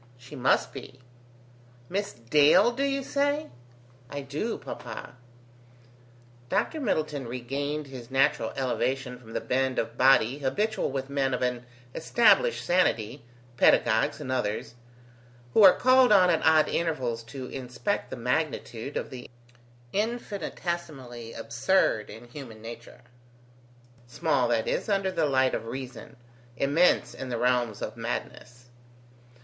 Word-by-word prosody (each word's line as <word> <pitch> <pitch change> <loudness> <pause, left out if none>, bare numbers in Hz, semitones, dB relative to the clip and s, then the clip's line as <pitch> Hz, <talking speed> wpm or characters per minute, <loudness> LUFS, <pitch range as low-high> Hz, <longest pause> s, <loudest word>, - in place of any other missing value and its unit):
"She 125 +4 -12
must 130 -1 +2
be." 130 - -10 0.9
"Miss 200 +5 -2
Dale, 145 - +4
do 250 +3 -4
you 275 0 0
say?" 285 +3 -1 0.6
"I 145 - -5
do, 145 +12 -3
Papa." - - -8 1.3
Dr 315 - 0
Middleton 155 - -1
regained 140 +5 -3
his 130 -3 -10
natural 135 -4 +2
elevation 130 -1 -2
from 115 -2 -13
the - - -1
bend 130 0 0
of - - -3
body 130 0 +4
habitual 205 +10 -1
with 135 0 -4
men 135 -2 +1
of 125 - -3
an 125 -1 -2 0.3
established 235 - +3
sanity, 125 - +1 0.3
paedagogues - - +3
and 130 - -5
others, 115 -3 -2 0.8
who - - +5
are 195 -3 +10
called 255 -1 +5
on 185 -3 +6
at 165 - +1
odd 160 -1 +5
intervals 130 -9 -1
to 130 +3 -7
inspect 130 +10 -3
the - - -5
magnitude 125 -1 -2
of - - -4
the 125 -2 -9 0.6
infinitesimally 170 - -4
absurd 115 - +1
in 120 +2 -11
human 120 -4 -10
nature: 115 +1 -10 1.1
small, 125 0 +1
that 115 -2 0
is, - - -1
under 195 -2 +1
the 165 -4 +1
light 130 -2 +2
of 115 - -3
reason, 130 0 -7 0.4
immense 145 +8 +3
in 130 - -7
the 120 - -2
realms 120 -3 0
of - - -5
madness. 125 0 -6
135 Hz, 130 wpm, -27 LUFS, 125-175 Hz, 1.3 s, are